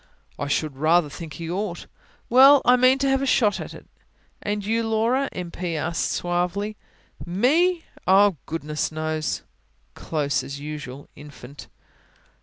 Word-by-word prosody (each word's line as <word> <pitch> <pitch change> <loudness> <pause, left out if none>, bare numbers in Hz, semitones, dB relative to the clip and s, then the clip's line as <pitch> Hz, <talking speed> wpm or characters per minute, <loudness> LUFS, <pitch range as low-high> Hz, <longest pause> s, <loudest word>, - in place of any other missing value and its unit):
"I 145 - -2
should 140 -1 -1
rather 160 +2 +3
think 160 +1 -8
he 165 - -7
ought." 180 +1 -4 0.4
"Well, 270 +3 +7
I 250 - +6
mean 255 +1 +4
to 275 0 0
have 270 0 +2
a 275 - -1
shot 215 -5 +2
at - - -7
it." - - -13 0.6
"And 205 -1 -3
you, 225 +2 +1
Laura?" 230 +5 +1
M. 175 -2 -6
P. 175 -1 -4
asked 165 +2 -1
suavely. 180 +4 -2 0.5
"Me? 315 - +2 0.2
Oh, 195 -1 +5
goodness 155 -1 -3
knows!" 155 0 -3 0.5
"Close 140 -4 -2
as 140 +2 -7
usual, 145 -2 -7
Infant." 145 -1 -12
175 Hz, 145 wpm, -24 LUFS, 155-230 Hz, 0.6 s, Well